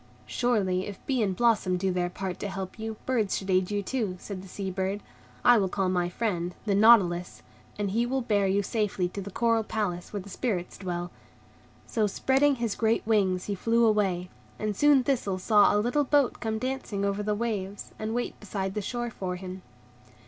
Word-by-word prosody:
"Surely, 195 -7 0
if 200 -2 -6
bee 260 -3 +1
and 195 -3 0
blossom 210 -5 +2
do 190 +1 0
their 180 -1 0
part 185 0 -5
to 205 - -3
help 190 +1 -6
you, 220 0 -4
birds 225 -6 +1
should 190 0 -3
aid 185 0 +2
you 205 -1 -1
too," 215 -4 -2
said 195 -1 -7
the 195 - -11
Sea 190 +1 -4
bird. 190 +2 -2 0.4
"I 245 -2 +7
will 190 -2 +1
call 190 0 0
my 180 -1 +1
friend, 180 -3 -2
the 205 - +1
Nautilus, 195 -5 +4 0.3
and 205 -2 -1
he 235 +4 +1
will 265 0 -1
bear 205 -4 +2
you 200 +1 +2
safely 200 -3 0
to 200 - -6
the 200 - -7
Coral 230 +2 +2
Palace 205 -5 -3
where 205 - -3
the - - -13
Spirits 190 -4 -3
dwell." 175 -2 -4 0.7
So, 215 -2 0
spreading 270 +7 +2
his 235 -4 -1
great 225 +1 +1
wings, 195 -4 +2
he 205 - -2
flew 230 +4 +2
away, 190 -5 +1 0.3
and 215 -1 -2
soon 290 +2 +5
Thistle 235 -8 0
saw 205 +2 +5
a 205 - +2
little 245 +8 +2
boat 285 -2 +2
come 220 -1 -2
dancing 240 -5 -2
over 200 +1 0
the 210 0 0
waves, 205 -3 -3
and 220 +1 -3
wait 245 - -3
beside 195 -2 -3
the 210 - -2
shore 240 +3 -3
for 185 -4 -4
him. 185 0 -7
205 Hz, 200 wpm, -28 LUFS, 185-230 Hz, 0.7 s, I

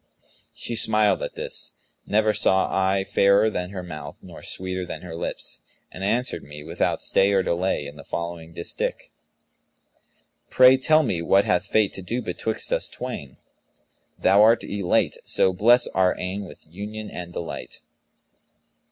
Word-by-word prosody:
She 120 - -2
smiled 110 -2 +3
at - - -5
this - - -3 0.3
(never 110 +1 +2
saw 95 -2 +2
I 95 0 +2
fairer 100 +3 +3
than 90 -2 -3
her 95 -2 -6
mouth 75 -5 -8
nor - - -11
sweeter 95 0 -3
than 90 - -7
her 85 -2 -7
lips), 85 - -4 0.3
and 95 - -8
answered 115 -3 0
me, 75 +1 -10
without 80 - -1
stay 100 +1 +3
or 95 -1 +3
delay, 85 -3 -1
in 70 +1 -9
the 70 - -10
following 85 0 -5
distich, 85 0 -4 1.4
"Pray, 130 0 +7
tell 155 +4 +4
me 90 - -1
what 95 +4 +3
hath 90 - +1
Fate 110 -2 +2
to - - -4
do 115 +7 -3
betwixt 110 -2 -2
us - - +1
twain? 70 -2 -7 0.4
* - - -41
Thou'rt 110 +4 +5
Elate: 100 -3 0
so 95 - +3
bless 120 +7 +5
our 95 -1 +1
eyne 95 +2 -4
with 90 - -13
union 105 +6 -7
and 85 -1 -7
delight.' 85 -1 -6
95 Hz, 155 wpm, -24 LUFS, 85-105 Hz, 1.4 s, Pray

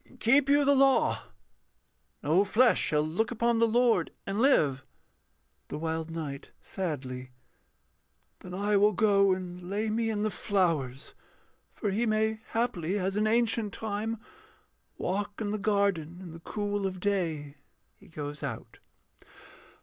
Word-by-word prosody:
Keep 265 +5 +4
you 285 0 +4
the 285 - +5
law 270 -1 +3 1.0
No 165 +7 +4
flesh 235 +5 +4
shall 150 -1 +2
look 165 +9 -1
upon 235 -1 +1
the 230 - +4
Lord 235 +1 +3 0.2
and 200 +3 -2
live. 145 - +3 0.8
THE - - -5
WILD 160 0 -3
KNIGHT 150 -4 -6
[sadly]. 130 -8 -5 1.1
Then 180 -1 -8
I 205 +1 +1
will 210 +1 +4
go 200 -1 +4
and 180 -1 -3
lay 215 +2 -1
me 225 +1 0
in 210 -1 -1
the 215 - 0
flowers, 165 - -1 0.6
For 205 - -2
He 230 +5 0
may 220 0 +1
haply, 205 -6 -1
as 190 0 -1
in 215 +1 +2
ancient 225 -2 +1
time, 220 +1 -3 0.8
Walk 205 +2 -3
in 210 -2 -2
the 215 - -2
garden 195 -5 0
in 185 -3 -9
the 165 - -10
cool 205 +2 -2
of 185 -1 -6
day. 165 -8 -2 0.4
[_He - - -18
goes 145 -1 -6
out. 130 -6 -6
200 Hz, 140 wpm, -29 LUFS, 165-220 Hz, 1.1 s, the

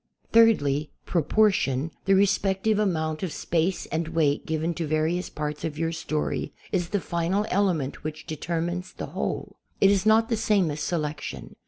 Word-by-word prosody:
Thirdly, 150 -11 +4 0.2
proportion, 165 -5 +2
the 195 - +5
respective 195 +1 +2
amount 160 -6 0
of 185 -4 -2
space 170 +4 -1
and 160 0 -1
weight 160 -3 +1
given 160 +2 -1
to 165 -2 -3
various 155 +4 0
parts 150 0 -4
of 155 -2 -3
your 165 +1 0
story, 155 -2 -2 0.2
is 175 -3 0
the 205 - 0
final 175 +4 -1
element 180 -9 0
which 155 +1 -5
determines 170 +3 -3
the - - -5
whole. - - -3 0.2
It 195 - +6
is' 200 +1 +2
not 225 +1 +5
the 230 - +1
same 205 -6 +2
as 145 - -5
selection. 150 -3 -4
170 Hz, 160 wpm, -26 LUFS, 155-195 Hz, 0.2 s, It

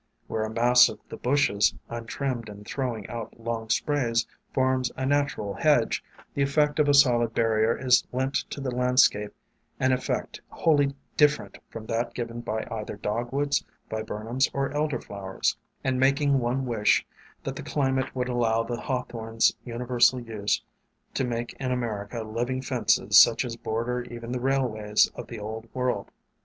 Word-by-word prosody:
Where 110 - -2
a - - -4
mass 120 +2 +6
of - - -7
the - - -6
bushes, 125 -6 +2
untrimmed 120 0 -4
and 105 0 -11
throw 125 -1 -2
ing 105 - -8
out 115 0 -7
long 115 -1 -4
sprays, 120 -2 +1 0.3
forms 130 -1 +1
a 130 - -1
natural 140 -8 0
hedge, 145 -5 +2 0.3
the 140 - -1
effect 145 +2 +2
of 150 -1 +4
a - - +5
solid 120 -5 +4
barrier 110 0 +2
is 130 -1 +4
lent 130 +2 -1 0.2
to - - -6
the 135 -2 -3
landscape 125 -4 +3 0.3
— - - -42
an 130 - +3
effect 130 0 -2
wholly 145 -4 +2 0.2
different 150 -1 +2
from 110 -1 -8
that 115 +1 -2
given 120 -1 -4
by 110 -1 -3
either 105 -2 -4
Dogwoods, 120 +8 -1 0.3
Viburnums, 110 +4 -1
or 140 0 0
Elder 150 -4 0
flowers, 95 -2 -2 0.3
and 130 -1 0
making 140 +1 +3
one 125 +2 -1
wish 110 -4 +2 0.4
that - - -4
the - - -6
climate 130 -2 -1
would 125 -1 -1
allow 115 -2 +1
the 120 +1 -4
Hawthorn's 115 -4 0
uni 120 0 -5
versal 120 0 +3
use 105 -2 -1 0.5
to - - 0
make 120 -1 -3
in 130 -2 -2
America 115 -2 -3
living 120 +4 -2
fences 110 -5 +4
such 120 +2 +6
as 115 -2 -4
border 120 +2 -2
even 120 0 -7
the 125 -1 -2
railways 115 -6 +2
of - - -8
the 120 - -7
Old 110 +2 -6
World. 125 -1 -1
120 Hz, 165 wpm, -26 LUFS, 115-130 Hz, 0.5 s, mass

